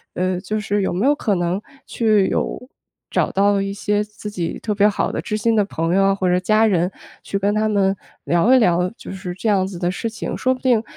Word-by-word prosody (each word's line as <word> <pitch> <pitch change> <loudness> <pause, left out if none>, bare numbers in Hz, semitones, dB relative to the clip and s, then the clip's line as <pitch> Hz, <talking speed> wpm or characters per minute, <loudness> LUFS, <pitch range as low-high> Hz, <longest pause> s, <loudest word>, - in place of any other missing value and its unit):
呃， 185 0 0
就 215 +4 -3
是 205 0 -1
有 190 - -1
没 195 +8 0
有 290 - +5
可 210 -8 0
能 175 +3 -1 0.2
去 215 -4 +2
有， 250 - -3 0.4
找 - - 0
到 200 0 +2
一 195 - -2
些 205 +1 0
自 210 0 -10
己 175 -5 -3
特 215 - -2
别 205 +1 +5
好 205 - -1
的 - - -3
知 215 - -3
心 225 +1 +1
的 210 - +4
朋 165 -3 -2
友 195 - +4
啊， 195 - +3
或 190 -2 -1
者 180 - +3
家 215 +4 +3
人， 180 -2 +1 0.3
去 200 - -2
跟 200 +1 +1
他 215 0 +1
们 195 -2 +2 0.3
聊 175 +9 +3
一 - - +7
聊， 180 -4 +2
就 - - -9
是 190 -2 -6
这 195 - -4
样 195 -2 +3
子 190 - -7
的 175 0 0
事 230 +4 -3
情， 220 - -5
说 255 - +1
不 255 - -9
定， 240 -4 +2
200 Hz, 265 characters per minute, -20 LUFS, 185-215 Hz, 0.4 s, 一